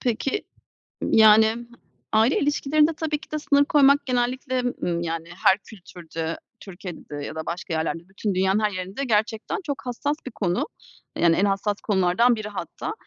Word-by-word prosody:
Peki, 255 - -1 0.6
yani, 220 +1 +6 0.5
aile 220 +5 +3
ilişkilerinde 300 +2 +2
tabii 310 -1 -2
ki - - -16
de 305 - -1
sınır 285 -1 +3
koymak 285 0 +4
genellikle, 255 +1 0 0.2
ımm, 170 -1 0
yani 165 0 -4 0.2
her 190 - +7
kültürde, 170 -6 -7 0.2
Türkiye'de 180 -5 -9
ya 155 - -7
da 160 0 -5
başka 175 0 -4
yerlerde, 165 +2 -2
bütün 195 0 -3
dünyanın 190 +2 +2
her 210 -1 +1
yerinde 190 +7 -4
gerçekten 220 - 0
çok 285 -5 -5
hassas 275 +4 -1
bir 260 - -6
konu. 185 -4 -1 0.5
Yani, 170 -1 +4
en 195 - +2
hassas 200 +1 -1
konulardan 200 +4 +3
biri 215 -1 -5
hatta. 200 - -5
215 Hz, 155 wpm, -24 LUFS, 180-265 Hz, 0.6 s, her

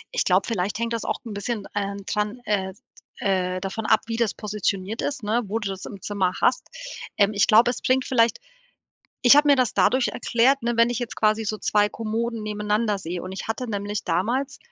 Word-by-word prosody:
Ich - - +2
glaube, - - +3
vielleicht 200 -3 -1
hängt 230 0 -2
das 230 - -2
auch - - -2
'n 220 - -6
bisschen, 205 0 -3
ähm, 200 -1 -3
dran, 210 +3 -2
äh 190 -2 -1 0.5
äh 185 -2 0
davon 210 +3 -4
ab, 220 - +4
wie 230 - -2
das 230 -2 0
positioniert 210 0 -2
ist, 275 -4 -3
ne, 225 +4 +1
wo 210 +3 -2
du 205 -3 -3
das 195 0 -6
im 200 -3 -9
Zimmer 190 -3 -1
hast. - - +2 0.5
Ähm, 205 +1 +4
ich 200 -2 +3
glaube, 230 +3 +6
es - - -7
bringt 260 0 +2
vielleicht 230 -3 +2 0.9
ich 260 +4 +9
habe 295 0 +5
mir 285 - +7
das 255 -3 +2
dadurch 250 +4 +3
erklärt, 245 +3 +2
ne, 235 0 0
wenn 230 +1 +4
ich 245 - -2
jetzt 240 -2 -5
quasi 215 0 +2
so 215 - -1
2 210 -1 +2
Kommoden 225 +1 -3
nebeneinander 210 0 -1
sehe 175 0 -5
und 185 +1 -6
ich 190 - -6
hatte 245 +3 -2
nämlich 205 0 -3
damals 260 +8 -1
215 Hz, 210 wpm, -24 LUFS, 200-235 Hz, 0.9 s, ich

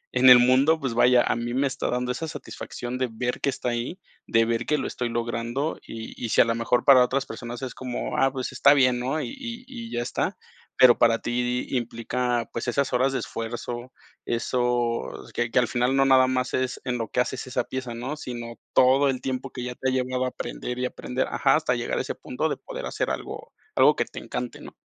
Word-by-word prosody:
en 130 +1 +7
el 125 - +11
mundo, 130 +6 +4
pues, 130 -5 -2
vaya, 120 +1 +5
a - - +1
mí 120 +1 -3
me 135 +2 +2
está 135 - -3
dando 125 0 -1
esa 160 +6 -4
satisfacción 125 -4 -6
de 130 -1 0
ver 125 +2 -3
que - - +2
está 125 - -2
ahí, 120 +9 -3 0.3
de 115 0 +3
ver 115 0 -1
que 150 - +2
lo 135 - -3
estoy 120 -1 -3
logrando 120 +5 -2
y 115 0 -8
y 115 - -2
si - - +2
a - - +5
lo 115 - +1
mejor 115 +1 +1
para 130 -2 +8
otras 130 +2 0
personas 120 +2 -7
es 130 - -4
como, 125 -2 -4
ah, 135 0 +4
pues 130 -2 -4
está 140 - +5
bien, 125 -3 +3
¿no? 130 +5 -1
Y - - -4
y 245 -3 -7
y 235 -3 -8
ya 120 - -1
está, - - -2 0.4
pero 125 -2 +7
para 115 -1 +5
ti 125 +1 -1
implica, 120 0 -1
pues, 115 - -4
esas 135 +2 0
horas 130 +2 +3
de 135 - 0
esfuerzo, 120 +2 -5 0.3
eso 120 - 0 0.2
que 120 0 -1
que - - -1
al 125 - +2
final 125 +2 +1
no 135 - +4
nada 130 -1 +6
más 130 0 -1
es 130 0 -1
en 125 -1 -1
lo 115 -2 -3
que - - -1
haces 130 +1 -3
esa 125 - -1
pieza, 125 -3 -5
¿no?, 130 +6 -4
sino 120 -4 -6 0.2
todo 135 +2 +5
el 130 -1 -1
tiempo 130 0 -3
que 125 - -6
ya 125 0 -4
te 130 - -1
ha - - 0
llevado 130 0 0
aprender 125 - -5
y 125 - 0
aprender 125 0 -2
ajá, - - +3
hasta - - +1
llegar - - -2
a - - +1
ese - - -4
punto - - -3
de - - -2
poder - - -7
hacer - - -2
algo - - -5 0.2
algo - - +6
que - - 0
te - - -9
encante, - - -5
¿no? - - -11
125 Hz, 230 wpm, -25 LUFS, 120-130 Hz, 0.4 s, el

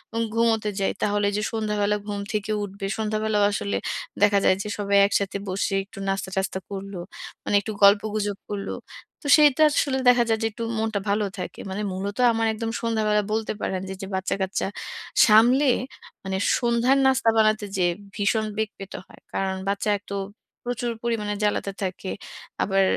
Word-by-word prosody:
উম 230 - +1
ঘুমোতে 225 -2 +2
যাই, 195 - +1
তাহলে 205 0 +1
এইযে 210 +1 -1
সন্ধ্যাবেলা 210 -2 0
ঘুম 205 -1 -3
থেকে 215 0 -1
উঠবে। 200 0 -6
সন্ধ্যাবেলাও 215 -1 0
আসলে 205 0 -1 0.5
দেখা 205 -1 +5
যায় 185 - +5
যে 210 - -5
সবাই 200 -1 +2
একসাথে 200 -1 0
বসে 195 +1 -1
একটু 195 - -12
নাস্তা-টাস্তা 190 0 -2
করল। 195 0 -6 0.5
মানে - - 0
একটু 215 - -5
গল্পগুজব 205 0 +4
করল। 200 -1 -4 0.5
তো - - -4
সেইটা 300 0 +5
আসলে 275 -2 +1
দেখা 245 -1 +5
যায় 225 -1 +2
যে 225 - +3
একটু 230 +2 -6
মনটা 220 -2 0
ভালো 210 +1 +2
থাকে। 180 - -6
মানে 190 +2 -3
মূলত 200 +2 -4 0.2
আমার 225 0 +1
একদম 225 +1 -3
সন্ধ্যাবেলা 215 -2 +1
বলতে 220 0 -1
পারেন 185 -1 -2
যে - - -3
এইযে 195 - -7
বাচ্চা-কাচ্চা 190 +1 -1 0.6
সামলে, 240 +6 +6 0.6
মানে 190 0 -2 0.2
সন্ধ্যার 240 +2 +3
নাস্তা 265 -3 +3
বানাতে 215 -1 +3
যেয়ে 175 -2 +2 0.2
ভীষণ 215 +1 +1
বেগ 220 -1 0
পেতে 195 -1 -7
হয়। - - -17
কারণ 190 -1 -1
বাচ্চা 200 +1 -1
এতো 200 0 -8 0.5
প্রচুর 245 0 -2
পরিমাণে 220 -3 -1
জ্বালাতে 205 -1 0
থাকে। 185 0 -4 0.5
আবার 195 0 +2
210 Hz, 160 wpm, -24 LUFS, 200-225 Hz, 0.6 s, সামলে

